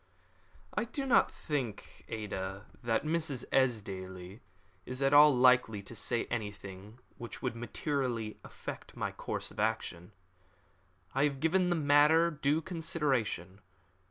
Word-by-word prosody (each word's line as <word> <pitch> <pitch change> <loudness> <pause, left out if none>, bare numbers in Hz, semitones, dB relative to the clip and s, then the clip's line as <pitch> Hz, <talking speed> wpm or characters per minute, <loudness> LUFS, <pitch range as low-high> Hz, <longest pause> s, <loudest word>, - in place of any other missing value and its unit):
"I 215 - 0
do 275 +4 -4
not 260 - +4
think, 130 - -4
Ada, 100 -2 -5 0.2
that 115 -2 +1
Mrs. 155 -5 -1
Esdaile 95 -6 -1 0.4
is 125 +1 -6
at 135 0 +2
all 150 +1 +9
likely 125 -5 +4
to 100 - -9
say 115 +2 -1
anything 105 -2 -6 0.2
which 120 -3 -8
would - - -1
materially 120 -2 -2
affect - - -8
my - - -2
course - - -4
of - - -10
action. 105 -4 -1 1.0
I 135 +2 +3
have 140 -2 -1
given 180 +4 +2
the 175 - +2
matter 155 +2 +5
due 150 +1 +1
consideration. 135 - -1
125 Hz, 130 wpm, -32 LUFS, 105-150 Hz, 1.0 s, all